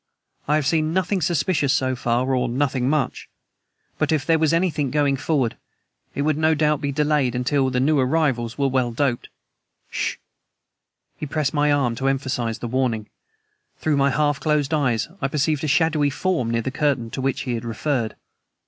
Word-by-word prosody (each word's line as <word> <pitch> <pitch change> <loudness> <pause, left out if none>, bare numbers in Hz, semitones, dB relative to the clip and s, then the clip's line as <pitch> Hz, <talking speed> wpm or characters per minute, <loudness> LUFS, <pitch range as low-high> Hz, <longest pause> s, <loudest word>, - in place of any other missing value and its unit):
I 150 - +3
have 155 -2 +1
seen 155 +2 +1
nothing 190 +1 0
suspicious 155 -2 +1
so 130 -1 +1
far 120 +2 0
or 125 -1 +1
nothing 130 0 0
much. 150 -3 -1 0.7
But - - +1
if 155 -4 +1
there 165 -1 +3
was 155 -1 +2
anything 165 -5 +1
going 145 0 +2
forward 135 -4 -1 0.6
it 140 - -1
would 155 0 +1
no 160 0 +3
doubt 150 -1 +1
be 140 - -1
delayed 145 -3 +1
until 130 +2 +1
we 125 -1 0
new 145 +3 +3
arrivals 130 -4 0
were 140 -1 +2
well 130 -2 0
doped. 120 0 -1 0.6
S - - -5
SH!" - - -1 1.0
He 150 - -5
pressed 150 0 -1
my 145 0 +2
arm 135 -5 +2
to 135 - -1
emphasize 130 -4 -1
the 120 - -5
warning. 115 -4 -1 0.7
Through 155 -2 0
my 140 0 +3
half 145 0 +1
closed 150 -1 0
eyes 130 -7 +1
I - - +1
perceived 150 +1 0
a - - 0
shadowy 150 0 +2
form 145 -4 -1
near 115 0 0
the 130 - -3
curtain 135 -5 0
to 135 - -4
which 135 0 -1
he 125 - -3
had 115 0 -3
referred. 115 0 -2
140 Hz, 185 wpm, -22 LUFS, 130-150 Hz, 1.0 s, I